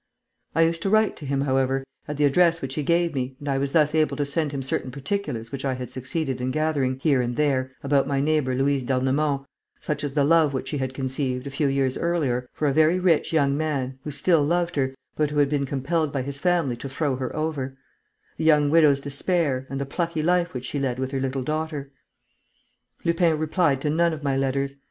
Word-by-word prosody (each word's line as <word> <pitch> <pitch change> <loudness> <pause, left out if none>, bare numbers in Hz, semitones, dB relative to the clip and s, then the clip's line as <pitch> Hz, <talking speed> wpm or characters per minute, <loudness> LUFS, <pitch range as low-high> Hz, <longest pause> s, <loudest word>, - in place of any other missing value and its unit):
I 165 - +5
used 165 0 +1
to 195 - 0
write 215 +1 +3
to 145 - -8
him, 135 0 0
however, 135 -1 +1 0.2
at 150 -1 -4
the 150 - +1
address 170 +3 +4
which 135 -3 -4
he 150 - -2
gave 170 +2 +1
me 130 -1 -3
and 145 - -9
I 135 -1 +1
was 140 0 -1
thus 150 -1 +3
able 155 -1 +2
to 145 - 0
send 145 +1 -1
him 140 -2 -4
certain 130 0 -2
particulars 140 - -4
which 135 -1 -5
I 135 -2 0
had 125 -1 -6
succeeded 130 0 -3
in 125 - -1
gathering, 140 -3 0
here 135 -2 +2
and 120 0 -2
there, 130 -3 0
about 140 0 +2
my 140 -1 0
neighbour 145 -3 +1
Louise 135 0 +1
d'Ernemont, 135 +2 0 0.3
such 150 -1 -3
as 145 -2 -3
the 145 - +3
love 155 -1 +4
which 130 - -3
she 145 - -2
had 130 0 -3
conceived, 130 -1 -2
a 140 - -5
few 145 +1 0
years 135 -1 0
earlier, 140 -8 0
for 150 - -1
a 140 - +2
very 160 +4 +4
rich 180 -4 +2
young 140 -4 +2
man, 140 -4 -2
who - - -5
still 150 +2 +2
loved 175 +3 0
her, 135 -2 0 0.2
but 150 -1 +1
who 150 - -4
had 145 -1 +4
been 140 -2 0
compelled 145 +3 -1
by 135 -2 -2
his 140 +1 -5
family 170 -7 +1
to 135 - -7
throw 140 -1 -1
her 130 -1 -4
over; 145 -4 -3 0.6
the - - -3
young 150 -2 +4
widow's 150 -4 +5
despair, 140 -2 -1
and 135 - -4
the 140 - -2
plucky 165 +2 -2
life 175 +1 +2
which 125 0 -4
she 145 - -3
led 130 -3 -1
with 130 0 -3
her 135 - -1
little 130 0 -2
daughter. 155 -1 -3 1.1
Lupin 170 -1 +3
replied 155 -2 +1
to 150 - 0
none 170 +1 +2
of 155 -1 -7
my 140 -2 +1
letters. 135 +1 -1
140 Hz, 225 wpm, -24 LUFS, 135-155 Hz, 1.1 s, I